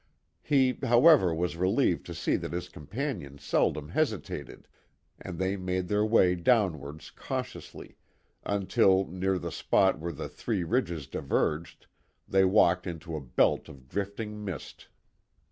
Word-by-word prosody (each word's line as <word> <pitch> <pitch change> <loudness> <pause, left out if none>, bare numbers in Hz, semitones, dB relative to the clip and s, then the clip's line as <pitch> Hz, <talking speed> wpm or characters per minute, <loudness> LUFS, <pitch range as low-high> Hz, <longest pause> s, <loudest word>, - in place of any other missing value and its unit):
He, 135 -3 +2
however, 125 - +6
was 85 +1 -1
relieved 95 +3 +1
to 85 - -6
see - - 0
that - - -6
his 90 0 -4
companion 90 - -5
seldom 75 +1 0
hesitated, 110 - -3 0.5
and 90 -3 -7
they 95 +2 0
made 90 -1 -3
their 105 0 +2
way 105 -5 +4
downwards 85 - 0
cautiously, - - -7 0.5
until, 95 -1 +2
near 95 +2 -1
the - - -5
spot 95 -4 +2
where 85 +2 -4
the 75 - -6
three 105 -6 -3
ridges 85 - -1
diverged, 75 +5 -2 0.4
they 95 0 +3
walked 95 -1 +3
into 85 -1 -6
a 75 - -4
belt 60 -3 +1
of 65 -2 -14
drifting 105 +4 -4
mist. 95 -8 -7
95 Hz, 135 wpm, -28 LUFS, 85-105 Hz, 0.5 s, however